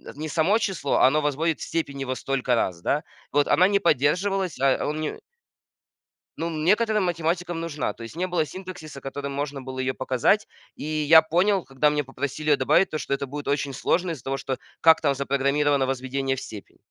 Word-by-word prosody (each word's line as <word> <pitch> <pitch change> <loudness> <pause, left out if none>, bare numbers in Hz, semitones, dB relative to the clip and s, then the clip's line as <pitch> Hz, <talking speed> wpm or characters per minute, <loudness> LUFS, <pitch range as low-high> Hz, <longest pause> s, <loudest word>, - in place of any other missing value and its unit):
не 155 +2 -5
само 175 +8 +3
число, 195 -10 -1
оно 150 +4 +4
возводит 150 +2 0
в - - -6
степень 140 -4 -3
его 130 -1 -2
столько 130 -2 0
раз, 90 -6 -1
да. 145 +10 0 0.3
Вот 145 0 +2
она 185 +2 +5
не 200 0 +2
поддерживалась, 180 +3 +1
а 135 -1 +2
он 150 +1 -2
не 155 - -4 1.2
Ну, 165 - -2
н 155 -2 -3
некоторым 215 0 +3
математикам 170 0 -1
нужна. 155 -4 -3
То 115 - -11
есть 115 - -9
не 185 - -1
было 175 -4 0
синтаксиса, 180 -5 -9
которым 140 +1 -5
можно 140 0 -4
было 130 0 -7
ее 130 0 0
показать. 130 - +1 0.3
И - - -9
я 155 +1 +5
понял, 180 +4 +1
когда 135 +2 +1
мне 150 0 0
попросили 140 +3 -4
ее 145 - +5
добавить, 155 +8 +3
то, 155 - -3
что 140 - -3
это 140 - -1
будет 145 +2 -7
очень 140 -1 -1
сложно 175 +5 0
из-за 145 -8 -7
того, 135 0 -2
что 135 -1 -3 0.2
как 160 0 +6
там 140 -3 +2
запрограммировано 140 +1 +1
возведение 135 +1 -2
в 135 - -7
степень. 105 -6 -10
150 Hz, 200 wpm, -25 LUFS, 135-170 Hz, 1.2 s, как